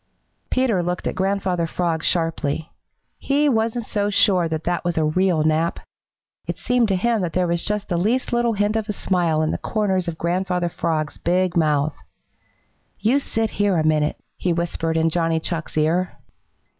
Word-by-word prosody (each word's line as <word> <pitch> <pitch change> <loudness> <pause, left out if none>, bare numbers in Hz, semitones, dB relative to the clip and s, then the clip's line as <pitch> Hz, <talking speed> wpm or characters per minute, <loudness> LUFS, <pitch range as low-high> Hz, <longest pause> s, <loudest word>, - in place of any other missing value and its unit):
Peter 245 -8 +2
looked 180 0 -3
at - - -1
Grandfather 190 -3 0
Frog 165 -1 -1
sharply. 165 -2 -1 0.5
He 290 +2 +2
wasn't 230 -2 0
so 205 -1 -1
sure 195 -4 +3
that 160 -1 -3
that 175 -1 -1
was 175 -1 -1
a 160 - +3
real 170 0 +2
nap. 155 +2 +1 0.7
It - - -3
seemed 245 -2 +2
to 195 - +1
him 225 +3 +1
that 175 -3 -2
there 180 -1 +2
was 170 0 0
just 210 -1 -2
the 175 - -1
least 240 +7 0
little 240 -1 +2
hint 205 +1 0
of 220 -1 -2
a - - 0
smile 170 -5 +1
in 155 - 0
the - - -3
corners 190 -5 0
of 165 -2 -3
Grandfather 180 +1 0
Frog's 160 -3 -2
big 180 +1 +1
mouth. 155 -2 +2 1.0
"You 245 +6 +2
sit 225 -5 -2
here 205 -3 +1
a 160 - +2
minute," 155 -1 +2 0.2
he 180 - 0
whispered 165 -1 -1
in 160 0 +2
Johnny 165 -1 +1
Chuck's 165 -1 -4
ear. 170 +4 +1
180 Hz, 180 wpm, -22 LUFS, 165-205 Hz, 1.0 s, sure